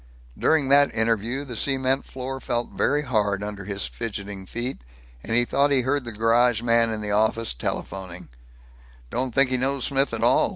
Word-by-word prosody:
During 155 -4 +2
that 140 +1 +5
interview 115 +4 0
the 125 -4 -7
cement 135 +2 +1
floor 135 +1 -6
felt 120 -2 -2
very 145 +2 +1
hard 105 -6 0
under 105 -2 -6
his 100 0 -1
fidgeting 100 -4 -6
feet, 120 +5 -4 0.4
and 115 - -3
he 120 0 +3
thought 140 +3 +2
he 135 -2 +3
heard 130 +1 -1
the 120 - -5
garage 115 +1 +2
man 115 -1 +3
in 110 -1 -4
the 105 -1 -3
office 110 +2 +1
telephoning, 90 +8 -5 0.8
"Don't 130 0 -1
think 135 -1 +4
he 130 - +2
knows 135 +1 0
Smith 140 0 +2
at 115 0 -2
all. 120 - +4
120 Hz, 180 wpm, -24 LUFS, 105-135 Hz, 0.8 s, that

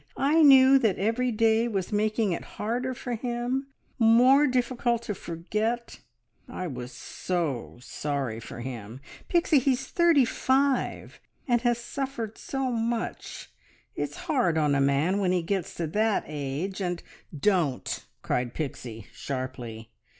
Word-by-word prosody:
I 300 +4 +3
knew 270 -2 +8
that 220 -7 +1
every 230 +5 0
day 225 +1 +3
was 195 -6 -2
making 215 0 +1
it 170 - -3
harder 245 +4 -2
for 245 0 -5
him, 245 +3 -2 0.3
more 250 +6 +6
difficult 245 -2 0
to 215 - -3
forget. 215 +8 -3 0.5
I 185 - -5
was 125 -6 -6
so 145 -1 -3
sorry 135 -4 -3
for 115 +1 -8
him! 120 -1 -7 0.3
Pixie, 340 -4 +4
he 265 +1 +2
is 250 - -4
thirty 335 -6 +4
five, 265 +3 0 0.3
and 240 -2 +2
has 240 -1 +2
suffered 240 -2 -5
so 270 -2 -2
much. 230 0 -3 0.4
It's - - -3
hard 250 - +2
on 150 -2 +2
a 140 - +2
man 140 +8 +2
when 185 -3 +1
he 180 -2 +1
gets 190 +1 -2
to 170 - -2
that 215 +6 +1
age, 150 +7 -4
and 175 -2 -2 0.2
" 150 - -12
"Don't!" 155 -9 -1 0.2
cried 125 -1 -1
Pixie 120 -7 -5
sharply. 125 -4 -6
215 Hz, 145 wpm, -27 LUFS, 150-250 Hz, 0.5 s, knew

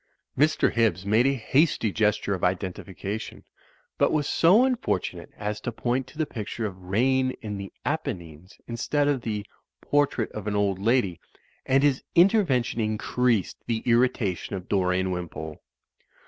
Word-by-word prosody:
Mr. 155 +3 +3
Hibbs 105 -6 +1
made 110 +5 +4
a 135 - +2
hasty 135 -2 +2
gesture 105 -1 +1
of 95 - -4
identification, 95 +2 -3 0.6
but - - +4
was 150 -3 +1
so 195 +10 +5
unfortunate 250 - -2
as 105 0 -3
to 120 - -3
point 125 +3 -1
to 130 - -16
the 160 - +1
picture 110 -2 -5
of 100 -3 -4
"Rain 130 +7 +1
in 105 -2 -4
the 100 0 -7
Apennines," 90 - -4
instead 140 +5 0
of 140 -3 +1
the 105 -3 -3 0.3
"Portrait 145 -6 +1
of 105 -1 -6
an 105 - -1
Old 100 -2 +1
Lady," 100 -5 +1 0.5
and 135 +1 +3
his 140 -3 +3
intervention 170 - +3
increased 110 0 0
the 115 -2 -1
ir 115 -1 +4
ritation 105 -8 -1
of 95 -2 -5
Dorian 95 -1 +1
Wimpole. 80 -3 -6
110 Hz, 150 wpm, -26 LUFS, 95-130 Hz, 0.6 s, so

